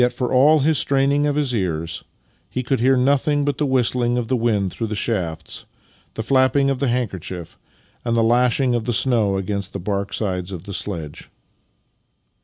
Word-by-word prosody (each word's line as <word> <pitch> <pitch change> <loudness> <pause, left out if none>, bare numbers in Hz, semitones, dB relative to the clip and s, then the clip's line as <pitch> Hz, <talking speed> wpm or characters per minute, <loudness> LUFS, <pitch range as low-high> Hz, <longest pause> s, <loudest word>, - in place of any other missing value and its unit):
for 125 0 -3
all 145 +4 +5
his 155 +1 +2
straining 140 +1 +2
of 145 - 0
his 145 -4 0
ears, 85 -6 -2 0.5
he 130 - -3
could 130 +2 0
hear 130 +2 +3
nothing 140 +2 +2
but 145 -1 -1
the 150 - +1
whistling 125 -1 +1
of 120 -2 -3
the 130 - +2
wind 110 -5 0
through 115 - -3
the 105 - -4
shafts, 85 -8 -3 0.5
the 110 - -3
flapping 135 +2 +3
of 135 - -2
the 140 - 0
handkerchief, 95 -8 -3 0.5
and 115 -1 0
the 115 - +3
lashing 125 +2 +2
of 120 -2 -1
the 120 - -1
snow 110 -5 +2
against 100 0 -4
the 100 - -4
bark 100 +1 -3
sides 95 -3 -2
of 90 -3 -7
the 100 - -8
sledge. 80 -7 -4
120 Hz, 185 wpm, -21 LUFS, 100-135 Hz, 0.5 s, all